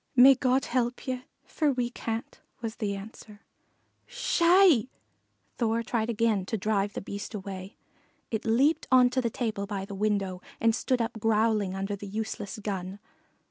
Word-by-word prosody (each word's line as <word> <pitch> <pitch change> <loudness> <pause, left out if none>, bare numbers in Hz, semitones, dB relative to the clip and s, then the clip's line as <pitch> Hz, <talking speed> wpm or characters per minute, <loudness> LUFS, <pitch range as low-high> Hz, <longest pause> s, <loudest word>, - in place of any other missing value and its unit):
"May 260 +2 +9
God 260 0 +1
help 245 0 -1
ye, 255 -1 -3 0.2
for 305 -3 +1
we 245 -2 -1
can't," 225 -1 -5 0.2
was 225 -1 -5
the 205 -3 -2
answer. 210 +1 -11 0.7
"Sssh - - -2
hi!" 340 - +6 0.7
Thor 230 -1 +1
tried 230 -1 -1
again 225 -3 +1
to 220 - -1
drive 205 0 0
the - - -4
Beast 200 +2 -6
away. 190 -1 -7 0.5
It 220 0 -2
leaped 260 +8 +2
on 250 -1 +6
to 255 0 +1
the 235 - 0
table 215 -4 -3
by 195 -2 -4
the 200 - -8
window 195 -2 -1 0.2
and 230 0 +3
stood 245 +1 0
up 230 0 -5
growling 215 -3 +2
under 195 +1 -2
the 200 0 -8
useless 210 0 -4
gun. 195 -2 -4
220 Hz, 165 wpm, -28 LUFS, 200-245 Hz, 0.7 s, May